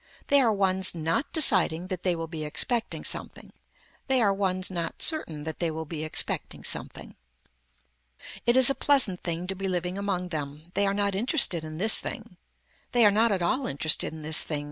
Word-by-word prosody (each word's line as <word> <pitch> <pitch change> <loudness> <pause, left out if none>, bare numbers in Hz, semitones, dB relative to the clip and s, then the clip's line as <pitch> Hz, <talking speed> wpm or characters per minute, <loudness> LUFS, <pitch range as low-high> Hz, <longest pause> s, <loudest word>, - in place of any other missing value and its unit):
They 280 0 +5
are 235 -4 +2
ones 190 -2 +1
not 165 - -2
deciding 185 - +4
that 185 -2 -5
they 180 -1 0
will 165 0 -5
be 160 -1 -7
expecting 230 - -1
something. - - -4 0.5
They 265 -1 +2
are 205 -4 +2
ones 185 -1 0
not 170 -2 -3
certain 165 - 0
that 160 0 -6
they 170 - 0
will 160 0 -6
be 155 0 -6
expecting 155 - -1
something. - - -4 1.3
It 240 +2 +3
is 260 +1 +5
a - - 0
pleasant 265 -12 +3
thing 170 0 -4
to 190 - -3
be 195 +1 -5
living 180 +1 -3
among 185 -3 -3
them. 150 +1 -7
They 200 - +1
are 195 - -1
not 200 -1 0
interested 200 - +1
in 155 0 -8
this 220 +5 +5
thing. - - -8 0.6
They 240 -2 +5
are 205 - +5
not 220 +2 +2
at 190 -3 -1
all 250 +10 -1
interested 150 +3 0
in 160 -1 -10
this 155 +1 +4
thing. 150 -2 -3
185 Hz, 195 wpm, -26 LUFS, 160-210 Hz, 1.3 s, They